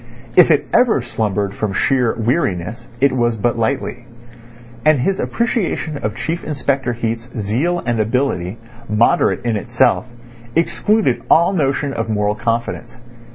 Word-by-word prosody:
If - - +7
it - - +3
ever 225 - +3
slumbered 105 -4 -2
from 105 -3 -3
sheer 125 +1 +1
weariness, 115 - -1
it 140 +1 +4
was 120 -3 0
but 115 +2 0
lightly; 125 0 -2 0.8
and 155 -2 +4
his 190 +8 0
appreciation 190 -10 -1
of 105 0 -3
Chief 165 +8 -3
Inspector 135 -3 -1
Heat's 115 +1 -3
zeal 120 - 0
and 120 -2 0
ability, 110 -4 -1 0.3
moderate 110 +3 +2
in 115 -2 +1
itself, 105 +4 +1 0.5
excluded 170 - +1
all 170 +4 +5
notion 140 -4 0
of 115 -2 -3
moral 105 -1 +1
confidence. 115 +1 -3
120 Hz, 135 wpm, -18 LUFS, 110-140 Hz, 0.8 s, If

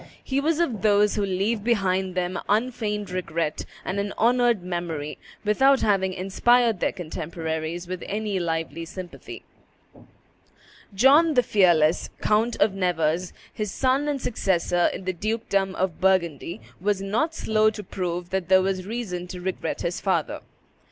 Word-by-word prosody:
He 270 +1 0
was 315 +2 +1
of 250 - 0
those 210 0 +4
who 210 - -1
leave 200 +3 0
behind 190 -5 +1
them 180 0 -1
unfeigned 210 -3 -1
regret 170 -4 -2 0.2
and 195 +2 -2
an 200 0 -3
honored 240 -3 +3
memory, 170 -4 -4 0.3
without 265 +6 +4
having 195 -3 +2
inspired 220 +4 +2
their - - +1
contemporaries 165 -1 -4
with 185 0 -5
any 205 -1 -2
lively 165 -1 -2
sympathy. 180 +1 -9 1.5
John 290 - +5
the 250 - +5
Fearless, 175 -7 +3
Count 220 +3 +2
of 205 -1 +3
Nevers, 175 -2 0 0.2
his 210 -2 -3
son 270 +2 +1
and 290 -2 -1
successor 175 -7 +1
in 190 - -7
the 185 - -1
dukedom 200 -1 -1
of 185 -2 -2
Burgundy, 175 - +1 0.2
was 195 +1 0
not 270 +12 0
slow 215 -4 +2
to 215 -1 -7
prove 180 -2 -4
that 190 -2 -2
there 190 0 +6
was 190 -1 -2
reason 200 -6 -4
to 180 0 -7
regret 185 +1 -3
his 175 +4 -2
father. 180 -6 -1
190 Hz, 145 wpm, -25 LUFS, 175-220 Hz, 1.5 s, there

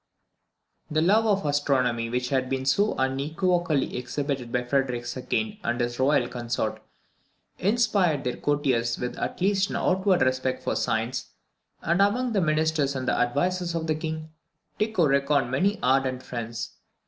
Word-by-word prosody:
_ - - -4
The 155 - +3
love 215 +5 +4
of 200 -4 +1
astronomy 130 -5 +1
which 125 +1 -1
had 130 -2 0
been 130 0 -2
so 200 +11 +2
unequivocally 155 +4 0
exhibited 130 0 -3
by 125 0 0
Frederick 125 -2 0 0.3
II. 215 -1 -1
and 120 +1 -1
his 120 0 -2
Royal 130 -2 +3
Consort, 120 -1 -3 0.8
inspired 200 - +2
their 125 - -2
courtiers 130 -6 0
with 125 - -4
at - - -3
least 195 +1 +2
an - - -4
outward 190 0 +2
respect 130 0 0
for - - -1
science; - - -1 0.5
and 170 +3 +2
among 240 +5 +2
the 200 - +2
ministers 155 -3 +1
and 130 -1 -3
advisers 175 +6 0
of 165 -1 -2
the 160 - +1
King, 155 0 -5 0.5
Tycho 215 -5 +2
reckoned 140 -2 +2
many 195 +11 +1
ardent 130 0 +1
friends. 115 -1 -6
145 Hz, 150 wpm, -26 LUFS, 130-180 Hz, 0.8 s, love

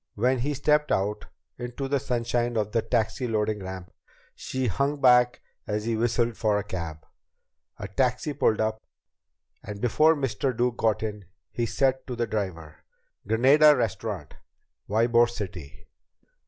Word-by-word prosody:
When 125 +4 +1
he 145 +4 -1
stepped 150 +2 +2
out 105 +2 -1 0.3
into 125 +3 -4
the 140 0 +1
sunshine 120 -1 -1
of 105 -1 -1
the 115 - +1
taxi 115 +2 -1
loading 110 -2 -1
ramp, 95 -1 -8 0.4
she 130 0 -4
hung 140 +7 0
back 125 -2 +4 0.3
as 105 0 -2
he 115 0 0
whistled 120 +1 0
for 105 -2 +1
a 105 - -2
cab. 85 -6 -6 0.7
A 105 - -6
taxi 125 +7 0
pulled 115 -5 +1
up, 110 0 -1 0.8
and 105 0 -8
before 155 +8 +4
Mr. 135 -2 -2
Duke 125 -1 0
got 110 -1 +1
in, 105 -2 -5 0.3
he 120 -1 -2
said 130 +2 0
to 125 - -4
the 120 0 -1
driver: 95 -8 -4 0.5
"Granada 140 +7 +6
Restaurant. 105 - -3 0.6
Ybor 115 +2 +3
City." 85 - -8
115 Hz, 145 wpm, -26 LUFS, 105-125 Hz, 0.8 s, Granada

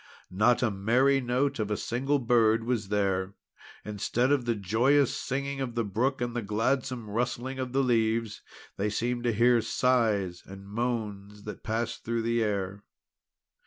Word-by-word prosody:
Not 110 +7 +3
a 120 - +2
merry 125 +8 +2
note 125 +3 0
of 105 -1 -1
a 105 - -1
single 135 +5 0
bird 115 -3 +3
was 115 -4 -1
there. 100 -2 0 0.5
Instead 110 +5 0
of 140 -4 +2
the 120 -1 +1
joyous 120 +8 +2
singing 140 +1 -3
of 120 -3 -4
the 120 - +1
brook, 120 +7 -1
and 120 -1 -2
the 120 - -1
gladsome 115 +3 -1
rustling 125 +4 -2
of 130 -1 -3
the 135 +1 +2
leaves, 115 -2 +1 0.4
they 105 +2 0
seemed 120 +3 -2
to 120 - +3
hear 120 +2 +4
sighs 110 -7 +1
and 95 +1 -11
moans 105 -3 -4
that 105 - -8
passed 115 +1 -3
through 115 0 -1
the 115 0 +1
air. 100 -1 -2
115 Hz, 160 wpm, -28 LUFS, 105-125 Hz, 0.5 s, hear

